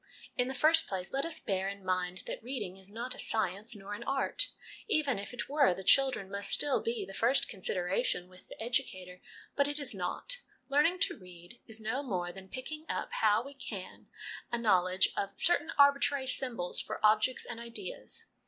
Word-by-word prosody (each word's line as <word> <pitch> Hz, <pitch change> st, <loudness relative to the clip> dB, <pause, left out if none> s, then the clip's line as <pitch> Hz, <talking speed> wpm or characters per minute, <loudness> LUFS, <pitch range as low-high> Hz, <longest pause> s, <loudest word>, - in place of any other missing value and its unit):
In 250 Hz, -, +1 dB
the 265 Hz, -, -4 dB
first 320 Hz, +4 st, +7 dB
place, 185 Hz, -2 st, -4 dB
let 275 Hz, +2 st, 0 dB
us 330 Hz, -1 st, -3 dB
bear 190 Hz, -1 st, -1 dB
in 200 Hz, -1 st, -8 dB
mind 185 Hz, 0 st, -1 dB
that -, -, -5 dB
reading 240 Hz, -6 st, -4 dB
is 190 Hz, 0 st, -8 dB
not 240 Hz, +4 st, -4 dB
a -, -, -11 dB
science 215 Hz, +1 st, -1 dB
nor 205 Hz, 0 st, -7 dB
an 205 Hz, -, -6 dB
art. 275 Hz, -, +2 dB, 0.4 s
Even 290 Hz, -, +1 dB
if 200 Hz, -, -7 dB
it 240 Hz, -4 st, -4 dB
were, 280 Hz, -10 st, +3 dB
the 190 Hz, -, -7 dB
children 260 Hz, -6 st, +3 dB
must 200 Hz, 0 st, 0 dB
still 290 Hz, -2 st, +2 dB
be 230 Hz, -3 st, -2 dB
the 195 Hz, -, -10 dB
first 235 Hz, +7 st, +3 dB
consideration 180 Hz, -2 st, -1 dB
with 185 Hz, 0 st, -17 dB
the -, -, -12 dB
educator; 185 Hz, -7 st, -3 dB, 0.3 s
but 280 Hz, 0 st, +3 dB
it 290 Hz, 0 st, -3 dB
is 280 Hz, -5 st, -1 dB
not. 195 Hz, -, -1 dB, 0.3 s
Learning 300 Hz, +6 st, +3 dB
to -, -, +2 dB
read 180 Hz, +3 st, -14 dB
is 225 Hz, -1 st, -6 dB
no 225 Hz, +5 st, -2 dB
more 180 Hz, -10 st, -2 dB
than 190 Hz, +1 st, -12 dB
picking 305 Hz, +6 st, -6 dB
up, -, -, -2 dB
how 215 Hz, +1 st, +4 dB
we 275 Hz, +2 st, -9 dB
can, 225 Hz, -8 st, -8 dB, 0.4 s
a 240 Hz, -, +1 dB
knowledge 185 Hz, -5 st, +3 dB
of 200 Hz, 0 st, -2 dB
certain 330 Hz, -2 st, +3 dB
arbitrary 280 Hz, -1 st, +5 dB
symbols 245 Hz, -8 st, -1 dB
for -, -, -5 dB
objects 215 Hz, +4 st, +3 dB
and 230 Hz, -, -7 dB
ideas. 235 Hz, -, -5 dB
225 Hz, 190 wpm, -32 LUFS, 190-275 Hz, 0.4 s, first